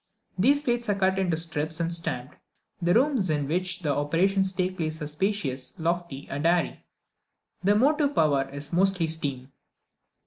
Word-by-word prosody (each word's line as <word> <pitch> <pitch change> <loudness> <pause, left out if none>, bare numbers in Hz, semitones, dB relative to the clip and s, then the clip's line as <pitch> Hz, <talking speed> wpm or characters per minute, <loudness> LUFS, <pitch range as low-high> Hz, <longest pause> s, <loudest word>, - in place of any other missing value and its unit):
These 280 +8 +4
plates 240 -3 0
are 205 - +2
cut 190 -1 +1
into 175 -4 +1
strips 160 -1 -2
and 170 0 -1
stamped. 150 -6 -4 0.5
The 175 +2 +2
rooms 250 - +2
in 145 -2 0
which 185 +3 +1
the 145 -3 +1
operations 190 +6 +1
take 185 0 -2
place 160 -1 -2
are 150 - -4
spacious, 150 -6 -2
lofty, 170 -4 -3
and 145 +2 -4
airy. 170 0 +1 0.8
The 200 +2 +4
motive 285 +5 +2
power 140 -4 +2
is 145 +2 -7
mostly 185 -1 +3
steam. 140 -5 -3
170 Hz, 160 wpm, -26 LUFS, 150-195 Hz, 0.8 s, These